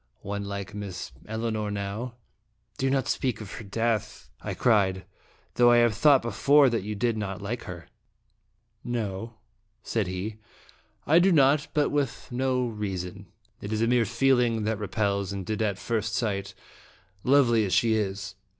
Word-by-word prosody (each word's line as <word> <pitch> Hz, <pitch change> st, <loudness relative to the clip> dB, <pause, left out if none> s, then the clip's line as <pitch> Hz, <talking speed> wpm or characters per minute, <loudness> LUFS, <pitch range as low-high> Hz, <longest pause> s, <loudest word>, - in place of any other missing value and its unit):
One 100 Hz, 0 st, -4 dB
like 100 Hz, 0 st, -5 dB
Miss 100 Hz, -4 st, -6 dB, 0.2 s
Elinor 110 Hz, -1 st, -2 dB
now 105 Hz, +4 st, -4 dB, 0.3 s
" -, -, -38 dB
"Do 135 Hz, -, +1 dB
not 135 Hz, -1 st, +1 dB
speak 125 Hz, -4 st, -1 dB
of 105 Hz, -3 st, -8 dB
her -, -, -7 dB
death," 110 Hz, -, -2 dB
I -, -, -4 dB
cried; 95 Hz, -5 st, +2 dB, 0.5 s
"though 120 Hz, 0 st, +5 dB
I 120 Hz, -, +6 dB
have 120 Hz, -2 st, +4 dB
thought 135 Hz, +4 st, +5 dB
before 135 Hz, +5 st, +4 dB
that 115 Hz, -, 0 dB
you 105 Hz, +2 st, -4 dB
did 115 Hz, +1 st, 0 dB
not 100 Hz, -2 st, -4 dB
like 115 Hz, +4 st, -5 dB
her." 90 Hz, -5 st, -8 dB, 0.5 s
" 115 Hz, 0 st, -46 dB, 0.2 s
No," 110 Hz, +2 st, -5 dB, 0.5 s
said -, -, -1 dB
he, 95 Hz, +4 st, -4 dB, 0.3 s
" -, -, -30 dB, 0.3 s
I 160 Hz, +3 st, +5 dB
do 190 Hz, +2 st, +4 dB
not, 145 Hz, 0 st, +4 dB
but 150 Hz, -1 st, +2 dB
with 145 Hz, -4 st, -2 dB
no 130 Hz, 0 st, 0 dB
rea 105 Hz, -5 st, -3 dB
son. 90 Hz, +2 st, -7 dB, 0.3 s
It 100 Hz, -, -6 dB
is 110 Hz, +1 st, 0 dB
a -, -, +2 dB
mere 120 Hz, -1 st, +3 dB
feeling 120 Hz, -1 st, +2 dB
that 110 Hz, 0 st, -1 dB
repels, 100 Hz, -1 st, -1 dB
and 100 Hz, -2 st, -5 dB
did 110 Hz, +3 st, -2 dB
at 100 Hz, -3 st, 0 dB
first 110 Hz, 0 st, -2 dB
sight, 100 Hz, -4 st, -2 dB, 0.7 s
lovely 125 Hz, -5 st, +4 dB
as 95 Hz, -, -2 dB
she 115 Hz, -1 st, +3 dB
is. 100 Hz, -3 st, -2 dB
110 Hz, 175 wpm, -27 LUFS, 100-120 Hz, 0.7 s, I